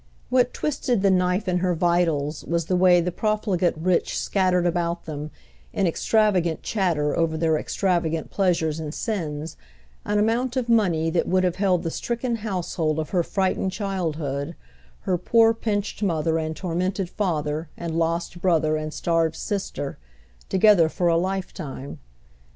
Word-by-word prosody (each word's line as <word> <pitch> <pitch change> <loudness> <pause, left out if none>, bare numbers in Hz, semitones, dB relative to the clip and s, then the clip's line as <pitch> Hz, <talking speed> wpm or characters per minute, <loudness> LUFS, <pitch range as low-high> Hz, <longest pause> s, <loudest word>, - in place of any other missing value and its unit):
What 250 -1 +3
twisted 260 -7 -1
the 195 - +5
knife 180 +2 +1
in 180 -1 +1
her 180 -1 +1
vitals 165 -4 +1
was 170 -1 -1
the 185 - 0
way 180 -1 +5
the 180 +1 -1
profligate 195 -4 0
rich 175 +2 0
scattered 185 -2 +1
about 170 0 -1
them, 150 -1 -5 0.4
in 195 - +1
extravagant 180 -2 +1
chatter 170 -8 0
over 165 -1 +1
their 160 -1 +2
extravagant 165 -1 -1
pleasures 165 -5 +1
and 155 -1 -5
sins, 160 -8 -3 0.5
an 210 - 0
amount 235 +5 +1
of 250 -2 -1
money 175 -9 +2
that 170 - 0
would 185 0 +2
have 180 -1 0
held 190 -3 +2
the 165 - -2
stricken 235 +3 -2
household 180 -7 -2
of 155 -1 -3
her 180 - +2
frightened 190 +1 -1
childhood, 165 -7 -3 0.5
her 180 -2 0
poor 225 +4 +4
pinched 210 -2 -2
mother 165 -4 +1
and 160 0 -3
tormented 185 +2 -2
father 160 -5 -2
and 170 -2 -4
lost 170 +1 -1
brother 160 -4 +2
and 155 0 -5
starved 165 -1 +1
sister, 195 -8 -4 0.5
together 190 -4 +5
for 175 +1 0
a 165 - +3
lifetime. 170 -6 -4
175 Hz, 150 wpm, -24 LUFS, 160-195 Hz, 0.5 s, the